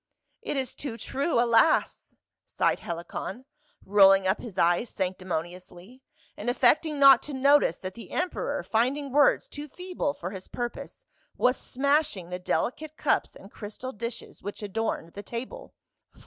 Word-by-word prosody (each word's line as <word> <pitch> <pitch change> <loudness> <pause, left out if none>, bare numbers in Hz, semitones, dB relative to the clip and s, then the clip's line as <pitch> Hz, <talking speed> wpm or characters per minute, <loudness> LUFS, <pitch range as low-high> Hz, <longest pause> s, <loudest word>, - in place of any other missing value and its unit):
"It 450 -10 -3
is 260 -2 -2
too 255 -6 -6
true, 275 +3 -1
alas!" 235 +5 +2 0.3
sighed - - +1
Helicon, 190 +6 -6 0.4
rolling 195 -1 +6
up 190 +2 +1
his 215 -6 -9
eyes 175 +6 +2
sanctimoniously, 180 +4 -5 0.3
and 220 - -3
affecting 290 +5 +3
not 275 -3 +8
to 295 - -8
notice 275 - +4
that 185 0 -7
the 230 - -11
emperor, 330 -5 -2
finding 265 +5 0
words 290 +1 +4
too 290 +1 -8
feeble 360 -2 -3
for 180 +2 -6
his 190 -2 -9
pur 240 0 -3
pose, - - -11 0.3
was 250 +1 +3
smashing 275 - 0
the 180 0 -4
delicate 305 +11 -2
cups - - 0
and 195 - -14
crystal 220 +5 -7
dishes 235 0 -7
which 205 +1 -7
adorned 205 -5 -3
the 205 - -7
table. 245 - -7
235 Hz, 150 wpm, -27 LUFS, 190-280 Hz, 0.4 s, not